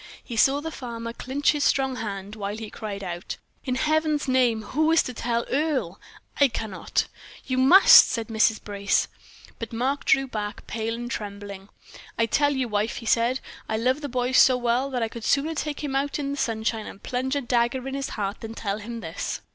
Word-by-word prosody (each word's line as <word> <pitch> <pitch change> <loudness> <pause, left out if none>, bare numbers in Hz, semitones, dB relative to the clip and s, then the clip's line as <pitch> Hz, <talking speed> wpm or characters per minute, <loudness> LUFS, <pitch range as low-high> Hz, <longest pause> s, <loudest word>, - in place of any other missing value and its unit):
He 240 - -7
saw 275 +5 +4
the 320 +1 -5
farmer 230 -4 -6
clinch 270 +5 0
his 295 -1 -1
strong 265 -2 +1
hand, 200 -2 -5
while 205 0 -4
he 220 -2 -7
cried 205 -2 -6
out: 175 -1 -5 0.3
"In 255 -2 -1
Heaven's 310 +1 +1
name, 245 -4 +2
who 310 +8 +1
is 330 - +5
to 250 - -5
tell 235 0 -1
Earle? 265 - -1 0.4
I 285 - +7
cannot." 215 -5 -2 0.4
"You 255 -1 -1
must!" 340 +10 +9
said 230 -2 -2
Mrs. 220 0 +2
Brace. 200 -1 0 0.5
But 230 - -6
Mark 260 +5 -1
drew 270 0 +4
back 210 -5 -5
pale 225 0 -3
and 240 0 -6
trembling. 200 -2 -6 0.5
"I 230 - +3
tell 285 +5 +2
you, 260 -2 0
wife," 210 +1 -1
he 230 - -7
said, 235 +3 +2 0.3
"I 220 - 0
love 255 +6 +1
the 285 - -4
boy 250 0 -1
so 260 0 +6
well 245 +2 0
that 250 -3 -1
I - - +1
could 230 0 -9
sooner 290 +6 +1
take 300 -1 -4
him 275 -2 -2
out 275 +1 0
in 280 -2 -3
the 280 - -4
sunshine 220 -2 -1
and 195 - -11
plunge 260 +2 -2
a 285 - 0
dagger 245 +1 0
in 270 - -4
his 275 0 -3
heart 200 -1 -3
than 225 0 -7
tell 205 -2 -3
him 230 +2 -7
this." - - -4
240 Hz, 205 wpm, -25 LUFS, 220-270 Hz, 0.5 s, must